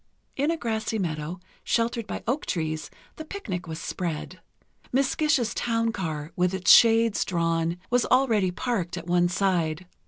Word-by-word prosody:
In 285 +3 +1
a 330 - 0
grassy 220 -3 -2
meadow, 165 -2 -3 0.2
sheltered 230 -1 0
by - - -5
oak 260 +6 -1
trees, 155 -3 -2 0.3
the 315 - -6
picnic 200 - -5
was 160 -1 -5
spread. 170 +1 -4 0.5
Miss 270 +1 +2
Gish's 300 -7 +1
town 230 -1 0
car, 160 -6 -4
with 180 +1 +1
its 190 - +4
shades 230 -2 +6
drawn, 165 -1 0
was 245 -1 +3
already 230 -7 +3
parked 180 -3 -2
at 170 - -6
one 175 0 +2
side. 175 -3 0
190 Hz, 155 wpm, -26 LUFS, 170-235 Hz, 0.5 s, shades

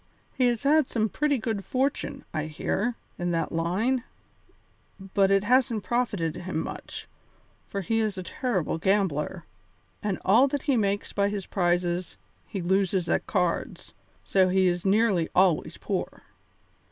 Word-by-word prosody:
He 255 - +2
has 240 -2 0
had 295 0 +4
some 220 -2 0
pretty 295 +2 +1
good 220 -4 -2
fortune, 265 +5 -2
I 155 -1 -1
hear, 200 +9 -1 0.2
in 175 0 -1
that 165 - -1
line, 200 +10 0 1.1
but 195 -1 +4
it 195 0 +3
hasn't 240 -2 +2
profited 205 -8 -1
him 175 -2 -4
much, - - -6 0.6
for 200 - -3
he 225 +5 0
is 215 -3 -1
a 185 - -4
terrible 185 - -2
gambler, 190 -3 0 0.6
and 205 -3 -1
all 230 +8 +6
that 280 0 -3
he 280 -3 +2
makes 205 -3 0
by 200 0 +2
his 200 -2 -4
prizes 175 -1 0 0.3
he 195 -5 -4
loses 190 -1 +1
at - - 0
cards, 180 -4 -1 0.3
so 190 -1 +3
he 190 0 +3
is 175 +1 0
nearly 195 -5 +3
always 185 -3 +3
poor. - - -4
195 Hz, 150 wpm, -27 LUFS, 180-230 Hz, 1.1 s, all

